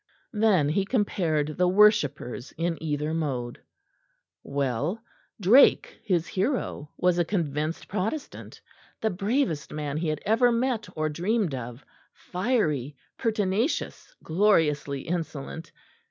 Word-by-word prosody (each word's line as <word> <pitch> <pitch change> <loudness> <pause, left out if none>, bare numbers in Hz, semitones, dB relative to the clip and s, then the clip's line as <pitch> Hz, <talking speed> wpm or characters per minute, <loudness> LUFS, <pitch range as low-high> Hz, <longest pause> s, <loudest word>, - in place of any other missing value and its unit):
Then 210 -9 +3
he 190 +6 +1
compared 170 - 0
the 180 - +4
worshippers 180 - +2
in 165 0 -2
either 150 0 -2
mode. 130 -7 -3 0.8
Well, 140 - -2 0.4
Drake, 260 - +5
his 180 -6 +1
hero, 190 - -2
was 180 -1 +2
a - - +4
convinced 160 -3 -2
Protestant; 215 +9 -4 0.4
the 220 - 0
bravest 195 - -1
man 150 -1 -3
he 165 +1 -1
had 155 -1 -2
ever 235 +3 +4
met 235 -3 -1
or 155 0 0
dreamed 180 +3 0
of 125 0 -7 0.3
fiery, 170 - -1 0.2
pertinacious, 220 - -1
gloriously 155 -7 +2
insolent. 160 -1 -5
170 Hz, 110 wpm, -26 LUFS, 150-210 Hz, 0.8 s, Drake